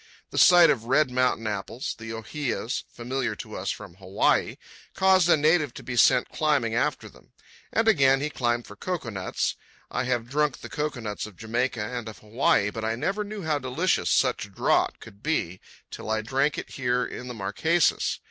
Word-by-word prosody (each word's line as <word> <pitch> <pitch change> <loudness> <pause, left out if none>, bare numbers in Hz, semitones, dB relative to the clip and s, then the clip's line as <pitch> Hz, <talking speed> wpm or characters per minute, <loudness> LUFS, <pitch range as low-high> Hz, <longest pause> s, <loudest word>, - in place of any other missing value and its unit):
The - - -1
sight 175 -2 +8
of 115 -4 -2
red 135 +2 +3
mountain 125 -2 +1
apples, 105 +4 -3
the 110 0 -8
ohias, 120 +2 -3
familiar 125 +2 -3
to 110 -2 -8
us 95 +1 -3
from 95 -4 -6
Hawaii, 95 0 +1 0.4
caused 190 -2 +4
a 170 - +6
native 155 -3 +2
to - - -9
be 120 - -5
sent 120 +1 +4
climbing 145 -7 +1
after 120 - 0
them. - - -19 0.4
And 225 0 +1
again 135 -10 +5
he 150 +2 -2
climbed 120 -2 -1
for 105 - -12
cocoa 165 - -4
nuts. 95 -3 -2 0.3
I 125 - -1
have 120 -2 -1
drunk 150 +1 0
the - - -8
cocoanuts 120 -10 -3
of 105 -4 -15
Jamaica 115 +1 -1
and 120 0 -5
of 110 - -11
Hawaii, 105 -2 +1
but 110 - -6
I 110 +1 0
never 195 - -1
knew 205 -1 -7
how 155 -2 0
delicious 140 +8 0
such 125 -6 +1
draught - - +1
could 100 -2 -14
be 105 - -2 0.3
till - - -7
I 110 0 0
drank 135 +5 0
it - - -6
here 125 -1 0
in 125 - -7
the 125 - -6
Marquesas. 130 - +1
125 Hz, 185 wpm, -26 LUFS, 110-150 Hz, 0.4 s, sight